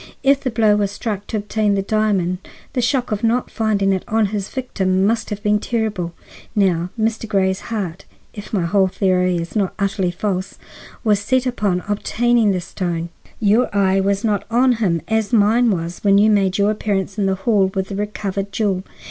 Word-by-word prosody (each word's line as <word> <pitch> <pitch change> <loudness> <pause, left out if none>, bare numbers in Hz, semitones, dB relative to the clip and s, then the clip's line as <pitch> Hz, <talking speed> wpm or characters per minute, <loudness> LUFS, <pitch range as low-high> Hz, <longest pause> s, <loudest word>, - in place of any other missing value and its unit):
If 275 0 +4
the 260 - -1
blow 215 -2 +3
was 205 -1 +1
struck 205 0 -4
to 220 - -2
obtain 210 0 0
the 195 - 0
diamond, 195 -4 0 0.3
the 255 - 0
shock 250 0 0
of 210 +1 -2
not 235 +2 +1
finding 205 -3 +1
it 190 - -2
on 220 0 +2
his 200 -2 -3
victim 190 -8 0
must 220 +1 0
have 210 -1 -5
been 210 -1 +2
terrible. 210 -7 -2 0.4
Now 180 -4 +2
Mr. 225 +1 -1
Grey's 190 -1 +1
heart, 195 -6 -4 0.3
if 205 -1 -9
my 195 -5 0
whole 190 +2 +3
theory 185 -1 +1
is 170 +4 -5
not 200 -3 0
utterly 195 -2 0
false, 185 +1 -3 0.5
was 210 -3 +3
set 255 +5 +1
upon 205 -8 0
obtaining 230 +2 +1
this 180 -3 -1
stone. 170 -3 -3 0.3
Your 220 +3 +3
eye 195 -1 +3
was 200 +2 0
not 205 -3 +1
on 250 +3 +4
him 175 -7 0
as 220 0 0
mine 230 +2 +4
was 170 -3 -2
when 200 -1 +5
you 215 +2 +5
made 195 -2 +2
your 205 +1 +3
appearance 200 -2 -2
in 195 - +2
the 190 - +1
hall 195 -1 +2
with 190 0 -2
the 200 - -4
recovered 200 -1 -3
jewel. 195 -3 0
205 Hz, 190 wpm, -20 LUFS, 190-220 Hz, 0.5 s, when